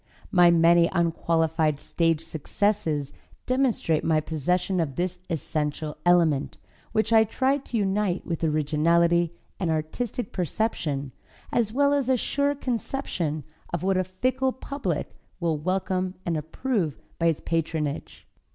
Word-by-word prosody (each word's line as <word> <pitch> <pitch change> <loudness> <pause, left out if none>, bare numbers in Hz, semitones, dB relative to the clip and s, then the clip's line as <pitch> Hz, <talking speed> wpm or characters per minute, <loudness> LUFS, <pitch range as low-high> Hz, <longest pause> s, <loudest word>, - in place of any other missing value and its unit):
My 175 -2 +6
many 170 0 +5
unqualified 165 -3 +1
stage 165 -1 +1
successes 160 -2 -1 0.3
demonstrate 255 - +1
my 160 -1 +3
possession 180 +5 0
of 145 -5 -1
this 180 0 -2
essential 150 -2 -2
element, 165 -5 +3 0.3
which 220 +1 +1
I 220 0 +7
try 260 +5 +1
to 250 -3 -4
unite 195 -2 0
with 165 -1 -3
originality 165 +3 +2 0.2
and 175 - 0
artistic 195 +9 -2
perception, 155 - -1 0.4
as 230 -3 +1
well 280 +4 +3
as 275 -3 +1
a 260 - +4
sure 285 +4 0
conception 225 - -2 0.3
of 170 -1 -2
what 195 0 +2
a 185 - +2
fickle 255 +8 0
public 260 - -3 0.3
will 165 -3 0
welcome 185 +2 -1
and 170 - 0
approve 160 - -1 0.2
by 170 - +3
its 165 -3 +1
patronage. 160 -3 -2
170 Hz, 130 wpm, -26 LUFS, 160-210 Hz, 0.4 s, I